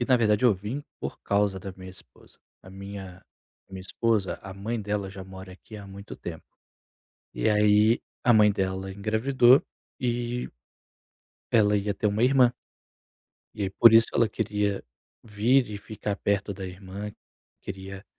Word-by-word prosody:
e 120 - +1
na 130 0 +4
verdade 105 -1 +2
eu 120 -5 +6
vim 110 +10 -5 0.2
por - - -6
causa 100 -2 +1
da 95 0 -7
minha 95 0 -10
esposa. 90 - -16 0.2
A 95 - -13
minha 95 -1 -9 0.5
a - - -22
minha 95 - -6
esposa, 110 0 -1
a 95 -1 -8
mãe 110 +4 -3
dela 100 -2 -3
já 95 -1 -9
mora 95 0 -10
aqui 105 +3 -13
há 100 -1 -10
muito 100 +1 -10
tempo. 80 -2 -8 0.9
E - - 0
aí 105 +2 +4 0.2
a 120 - +6
mãe 105 -1 +6
dela 95 0 -2
engravidou 120 +5 +4 0.4
e 120 -1 -2 1.0
ela 105 -2 +4
ia 100 0 -1
ter 105 - -1
uma 105 +3 0
irmã. 125 -2 +5 1.0
E 100 -2 -2
por 115 +4 +7
isso 115 0 +7
ela 115 -3 +3
queria 105 -2 -1 0.4
vir 115 +4 +2
e 105 - -5
ficar 105 -1 -5
perto 100 0 -1
da 95 0 -7
irmã, 95 +3 -7 0.5
queria 95 0 -8
105 Hz, 160 wpm, -26 LUFS, 95-115 Hz, 1.0 s, por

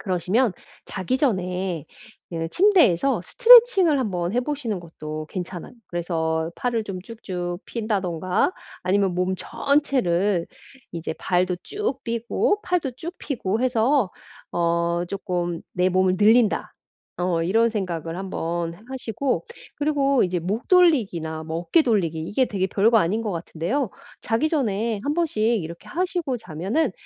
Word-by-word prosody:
그러시면 190 +4 +1 0.3
자기 205 +7 -2
전에 185 - -1 0.4
이 165 -1 -3
침대에서 300 - +4
스트레칭을 460 - +6
한번 180 -7 -1
해 245 - +2
보시는 250 -7 -3
것도 155 -2 -7
괜찮아요. 180 0 -6
그래서 160 -2 -1
팔을 235 -3 -1
좀 190 -3 -5
쭉쭉 180 -5 -5
편다든가 190 - -1 0.3
아니면 190 0 +1
몸 180 +1 0
전체를 215 - +1 0.5
이제 165 -1 -4
발도 180 +1 0
쭉 405 - -3
펴고 235 - 0
팔도 345 -8 -1
쭉 340 +6 -6
펴고 225 -5 -2
해서 245 -3 +2 0.4
어 170 0 +1
쪼끔 175 -3 -3
'내 180 0 +2
몸을 185 0 +2
늘린다.' 220 +1 +3 0.4
어 175 -2 0
이런 225 +7 +3
생각을 170 -6 -3
한번 170 -3 -3
하 205 - -17
하시고 260 - -2 0.3
그리고 280 -3 +2
이제 180 0 -1
목 200 +8 -3
돌리기나 195 - +3
뭐 160 +1 -3
어깨 325 - +3
돌리기 190 - 0
이게 205 +11 +1
되게 190 -2 -1
별거 220 +4 +3
아닌 210 +5 +1
것 210 - -2
같은데요. 175 - -2 0.3
자기 230 +7 0
전에 225 -7 0
한번씩 295 -7 0
이렇게 185 -8 -1
하시고 350 -6 -1
자면은 195 - -1
200 Hz, 285 characters per minute, -23 LUFS, 175-255 Hz, 0.5 s, 스트레칭을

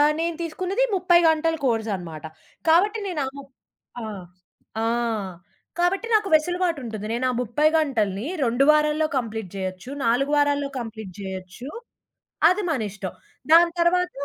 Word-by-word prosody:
ఆ! - - +7 0.2
నేను 335 0 -1
తీసుకున్నది 370 +8 -1
30 350 -1 +4
గంటల 320 +1 +2
కోర్సనమాట. 195 - -2 0.5
కాబట్టి, 405 +7 +4
నేను 330 -6 -2
ఆ - - -2
ముప్ 275 -1 -12 0.5
ఆ! - - -5 0.8
ఆ! - - +1 0.9
కాబట్టి 375 +6 +1
నాకు 425 -2 +3
వెసులుబాటుంటది. 310 - 0
నేనా 255 +2 0
30 295 +7 +2
గంటల‌ని 220 -8 0 0.2
2 245 +3 +2
వారాల్లో 305 +1 +2
కంప్లీట్ 220 -5 -5
జేయొచ్చు. 185 +5 -5 0.2
4 270 +5 +2
వారాల్లో 285 -1 +2
కంప్లీట్ 220 -4 -7
జేయొచ్చు. 190 +6 -7 0.8
అది 405 +3 0
మనిష్టం. 215 -6 -4 0.4
దాని 340 +1 +7
తర్వాత 360 +1 +3
280 Hz, 125 wpm, -24 LUFS, 220-340 Hz, 0.9 s, ఆ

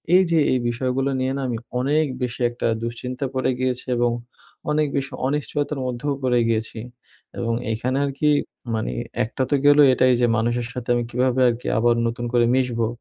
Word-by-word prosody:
এই 185 - +7
যে 165 - +4
এই 130 - +2
বিষয়গুলো 130 +3 -1
নিয়ে 130 +1 0
না, - - -3
আমি 120 -2 -2 0.2
অনেক 150 +5 +2 0.2
বেশি 125 0 -3
একটা 120 - -3 0.2
দুশ্চিন্তা 125 +3 -4
পড়ে 130 0 0
গিয়েছি 130 -1 -1
এবং 120 0 +2 0.6
অনেক 150 0 +2
বেশি 140 0 -2 0.2
অনিশ্চয়তার 145 0 -2
মধ্যেও 125 +3 -2
পড়ে 125 -1 +3
গিয়েছি। 115 0 -1 0.6
এবং 115 -1 -1 0.2
এখানে 125 +4 -1
আরকি 140 +2 0 0.5
মানে 110 - -2 0.3
একটা 120 +4 -2
তো 145 - +3
গেল 145 0 +7 0.2
এটাই 130 0 +4
যে 120 - +4
মানুষের 120 +1 0
সাথে 125 -1 -6
আমি 120 - 0
কীভাবে 125 +1 +1
আরকি 120 +1 -4
আবার 120 +1 +3
নতুন 120 +1 -3
করে 120 -1 +4
মিশবো? 120 -3 +1
125 Hz, 175 wpm, -22 LUFS, 120-135 Hz, 0.6 s, এই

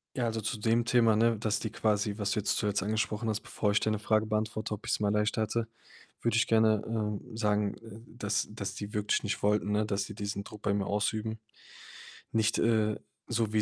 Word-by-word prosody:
Ja, 125 - 0
also, 115 -1 -1
zu 110 +2 -2
dem 115 +2 +2
Thema, 115 -3 +4
ne, 115 +1 +3
dass 110 0 0
die 110 - -3
quasi 105 -2 0
was 100 -2 -1
du 105 - +1
jetzt 105 - 0
zuletzt 105 -2 0
angesprochen 110 +2 -1
hast, 110 -1 -1
bevor 105 -2 -1
ich 105 - +3
deine 110 -1 0
Frage 110 +1 +2
beantworte, 110 0 -1
ob 105 - -7
ich's - - +1
mal 105 0 +1
leichter 105 +1 +1
hatte, 115 +1 -1 0.5
würde 115 -1 +1
ich 115 - +3
gerne, 110 -2 +4
ähm, 110 +1 -3
sagen, 105 -2 +1
äh, 110 0 -12
dass 105 -3 -1
dass 105 -2 -5
die 105 0 -6
wirklich 105 0 +1
nicht 105 - -2
wollten, 105 0 +2
ne, 105 +1 +2
dass 100 -1 -1
die 105 - -9
diesen 100 -1 -3
Druck 105 0 -11
bei 100 - +2
mir 100 -1 0
ausüben. 110 +2 -1 0.9
Nicht, 110 -1 +2
äh, 110 -2 +2 0.3
so 115 -2 0
wie 110 - +3
110 Hz, 215 wpm, -30 LUFS, 105-110 Hz, 0.9 s, Thema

